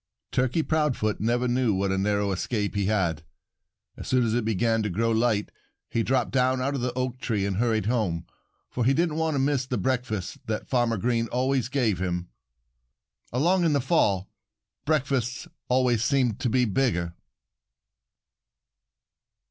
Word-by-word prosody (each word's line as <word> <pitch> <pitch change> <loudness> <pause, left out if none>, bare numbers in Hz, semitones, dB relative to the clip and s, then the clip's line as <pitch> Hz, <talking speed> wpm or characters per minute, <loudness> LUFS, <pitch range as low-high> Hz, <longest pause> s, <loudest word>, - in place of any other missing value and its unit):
Turkey 130 +6 +1
Proudfoot 150 -10 0
never 120 +3 +1
knew 120 -4 +1
what 95 0 0
a 95 - 0
narrow 100 0 +1
escape 105 +2 -2
he 100 -2 0
had. 90 -8 0 0.7
As - - -8
soon 130 -2 +2
as 110 - 0
it 120 0 +1
began 115 +1 +1
to 105 - -1
grow 115 +5 0
light 110 -2 +1 0.4
he 115 - +1
dropped 125 +1 0
down 130 0 +2
out 135 +2 -1
of 135 - -2
the 125 0 -1
oak 130 0 -3
tree 110 -5 -1
and 100 -2 -2
hurried 110 -3 +1
home, 100 -8 0 0.4
for 125 - -2
he 135 +3 +3
didn't 165 -1 +1
want 160 -1 0
to - - +1
miss 135 -1 +1
the 125 - -1
breakfast 125 -7 -2
that 110 -1 -3
Farmer 120 -3 +1
Green 115 +2 0
always 130 0 0
gave 120 -9 +1
him. 90 -1 -2 1.0
Along 175 +9 +2
in 165 -3 +3
the 140 - +3
fall, 105 - +1 0.6
breakfasts 135 -4 0 0.2
always 125 -3 +2
seemed 125 -3 +1
to 125 - 0
be 125 +2 +3
bigger. 95 -7 0
120 Hz, 165 wpm, -26 LUFS, 105-130 Hz, 1.0 s, he